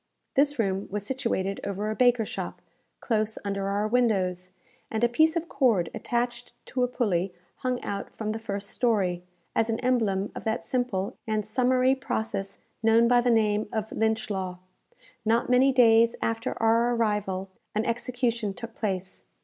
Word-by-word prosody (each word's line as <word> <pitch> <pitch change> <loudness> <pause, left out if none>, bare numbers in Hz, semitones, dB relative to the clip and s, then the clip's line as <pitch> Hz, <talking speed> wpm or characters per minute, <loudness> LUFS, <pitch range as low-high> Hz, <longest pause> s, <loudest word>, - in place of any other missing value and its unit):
This 290 +1 +2
room 195 -3 0
was 205 0 -3
situated 205 -6 -1
over 200 +1 -3
a - - -3
baker's 245 -3 +3
shop, - - -5 0.4
close 220 -2 0
under 200 -1 -2
our 205 +2 0
windows, 190 -7 +1 0.4
and 220 +1 -2
a - - +6
piece 315 +7 +3
of 335 0 -1
cord 225 - +2
attached 240 0 -2
to 255 - -3
a 250 - +3
pulley 195 -7 -1 0.2
hung 255 -1 -1
out 200 0 -4
from 215 -1 -3
the 220 - -3
first 200 -2 -4
story, 195 -8 +1 0.3
as 225 0 +2
an 225 - 0
emblem 220 -6 +1
of - - -7
that 220 +1 -1
simple 245 -7 -1
and 215 -1 0
summary 255 +3 +3
process 220 -6 -3 0.2
known 225 +1 +5
by 245 0 +5
the 245 - +1
name 215 -2 +2
of 220 -1 -3
Lynch 220 -1 0
law. 185 -2 -3 0.7
Not 230 +2 +1
many 260 +2 +5
days 230 -2 +5
after 225 0 -2
our 230 +2 +3
arrival, 210 -4 -1 0.3
an 215 +2 +1
execution 235 -3 -1
took 230 -2 -8
place. 190 -4 -3
225 Hz, 165 wpm, -27 LUFS, 200-245 Hz, 0.7 s, a